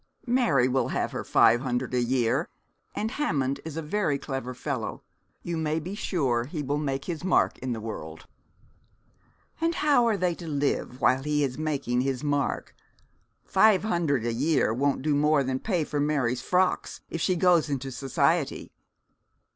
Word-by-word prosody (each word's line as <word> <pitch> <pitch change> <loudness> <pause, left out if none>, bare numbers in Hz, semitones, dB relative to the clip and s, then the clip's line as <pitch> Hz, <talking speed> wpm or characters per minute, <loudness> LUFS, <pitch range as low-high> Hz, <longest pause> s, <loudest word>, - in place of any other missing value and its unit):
'Mary 235 - +3
will 130 +1 +1
have - - -1
her - - -4
five 120 +2 +4
hundred 125 -1 -2
a 125 - +2
year. 120 -1 +1 0.5
And 220 +1 -2
Hammond 140 - -1
is 160 -1 -7
a 165 - -3
very 155 -3 0
clever 135 -3 -5
fellow. - - -4 0.4
You 170 -1 -3
may 160 0 0
be 175 +5 -6
sure 135 - 0
he 150 +2 -5
will 145 +2 -1
make 135 -2 -2
his 170 -2 -4
mark 185 - +2
in 130 0 -4
the 115 - -4
world.' 80 -8 -7 1.4
'And 335 +1 +1
how 285 -7 +3
are 220 -3 +2
they 180 -2 +1
to 170 0 -9
live 140 -3 -1
while 130 +2 +3
he 150 +1 0
is 130 -1 -2
making 140 -6 -1
his 135 0 -2
mark? 145 -1 -1 0.7
Five 200 0 +4
hundred 165 - 0
a 120 - 0
year 140 -2 +1
won't 135 +2 0
do 155 0 +1
more 150 0 +3
than 130 0 -2
pay 180 -3 0
for 145 -1 -3
Mary's 135 -5 0
frocks, 185 0 0
if 165 - -3
she 185 - +2
goes 175 -3 +3
into 135 -1 -3
society.' 135 +1 0
145 Hz, 170 wpm, -27 LUFS, 130-170 Hz, 1.4 s, five